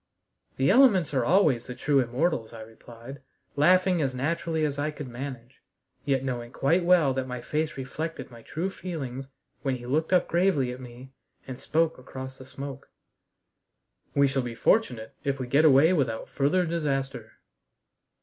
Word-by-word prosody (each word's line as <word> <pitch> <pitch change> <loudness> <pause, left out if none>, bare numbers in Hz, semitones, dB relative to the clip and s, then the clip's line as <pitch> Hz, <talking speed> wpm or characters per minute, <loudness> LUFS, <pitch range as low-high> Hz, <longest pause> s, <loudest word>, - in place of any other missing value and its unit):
"The 135 +6 +3
elements 205 - +5
are 130 -3 +2
always 150 -6 +3
the 125 - -6
true 140 +2 +2
immortals," 125 -1 -1
I 115 - -9
replied, 115 +4 -12 0.3
laughing 180 +3 +4
as 130 -3 -1
naturally 160 +3 -1
as 145 -1 -2
I 145 +1 0
could 150 -2 -7
manage, 125 0 -8 0.4
yet 135 -2 +1
knowing 120 -2 -4
quite 165 +8 +1
well 170 -6 +4
that 130 0 -3
my 125 -1 -5
face 155 +5 -2
reflected 135 +1 -5
my 115 -1 -12
true 170 +10 -4
feelings 135 -9 -6 0.3
when 135 -2 -1
he 120 -1 -9
looked 155 +7 0
up 180 -1 +3
gravely 170 -8 +1
at 125 +1 -8
me 125 +1 -11 0.3
and 130 -1 -8
spoke 165 -1 0
across 130 +1 -9
the 130 - -11
smoke: 135 0 -8 1.3
"We 140 0 +5
shall 135 0 0
be 120 -2 -6
fortunate 120 - +1
if 140 -2 -1
we 130 - -3
get 140 +6 +3
away 155 +4 +6
without 125 -9 -1
further 165 +6 +1
disaster." 145 -5 -3
135 Hz, 165 wpm, -27 LUFS, 125-160 Hz, 1.3 s, away